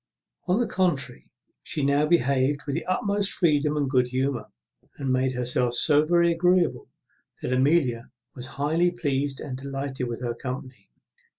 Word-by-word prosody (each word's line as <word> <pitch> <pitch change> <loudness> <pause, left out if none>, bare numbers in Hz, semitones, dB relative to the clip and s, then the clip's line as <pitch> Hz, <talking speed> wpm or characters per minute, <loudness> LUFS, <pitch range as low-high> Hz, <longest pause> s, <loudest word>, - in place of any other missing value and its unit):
On 185 +5 +2
the 240 - +2
contrary, 160 - -1 0.3
she 150 - -1
now 140 +2 +2
behaved 140 -3 +2
with 140 - -3
the - - -3
utmost 200 +2 0
freedom 150 -3 +1
and 145 -2 0
good 130 -2 +2
humour, 130 0 -2 0.5
and 135 -2 -1
made 130 0 +1
herself 125 0 -1
so 150 +4 +5
very 170 +1 +3
agreeable, 170 -6 +1 0.5
that 125 - -1
Amelia 130 -3 +1 0.2
was 125 -1 -7
highly 160 +5 +2
pleased 145 -5 -2
and 135 -4 -6
delighted 135 -1 -4
with 120 +1 -5
her 120 -1 -1
company. 125 -3 -8
140 Hz, 155 wpm, -25 LUFS, 130-165 Hz, 0.5 s, so